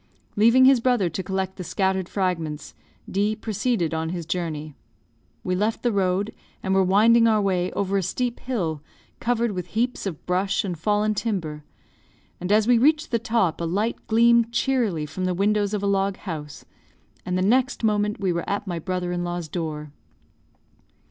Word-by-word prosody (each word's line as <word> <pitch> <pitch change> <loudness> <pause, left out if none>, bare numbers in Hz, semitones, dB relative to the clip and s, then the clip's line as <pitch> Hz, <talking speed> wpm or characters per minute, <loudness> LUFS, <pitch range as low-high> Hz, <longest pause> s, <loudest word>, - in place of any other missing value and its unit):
Leaving 230 +5 +6
his 265 -1 +6
brother 230 -8 +1
to 190 - -3
collect 190 0 -3
the 185 - -5
scattered 190 0 -1
fragments, 165 -6 -2 0.3
D 205 +2 0
proceeded 215 -5 -1
on 160 0 -2
his 170 -1 -4
journey. 155 -3 -3 0.7
We 185 - -1
left 210 +4 -1
the 240 - +2
road, 195 +1 0 0.3
and 190 - 0
were 190 0 +4
winding 225 +5 +5
our 220 -1 +3
way 185 -3 0
over 200 0 0
a - - -1
steep 245 +6 -2
hill, 170 - -2 0.4
covered 235 -1 0
with 180 -3 -4
heaps 245 -2 0
of 165 -6 -6
brush 185 +2 0
and 185 -3 -3
fallen 210 +5 +1
timber, 175 -9 -3 0.8
and 180 +2 -3
as 215 +1 +4
we 245 -1 +5
reached 305 +4 +3
the 230 - +2
top, 225 -8 0
a - - -1
light 205 +7 -2
gleamed 235 +1 +4
cheerily 235 - 0
from 185 +5 -4
the 180 -1 0
windows 205 +1 +1
of 210 -2 -2
a - - +1
log 195 -1 +1
house, 150 -6 -7 0.6
and 180 0 -2
the 185 - +1
next 250 +5 +2
moment 210 -1 +1
we 190 -3 0
were 170 0 -3
at 200 +1 -2
my 175 -3 -3
brother 180 +1 -3
in 175 0 -2
law's 175 -1 -3
door. 150 -3 -5
195 Hz, 180 wpm, -24 LUFS, 175-225 Hz, 0.8 s, Leaving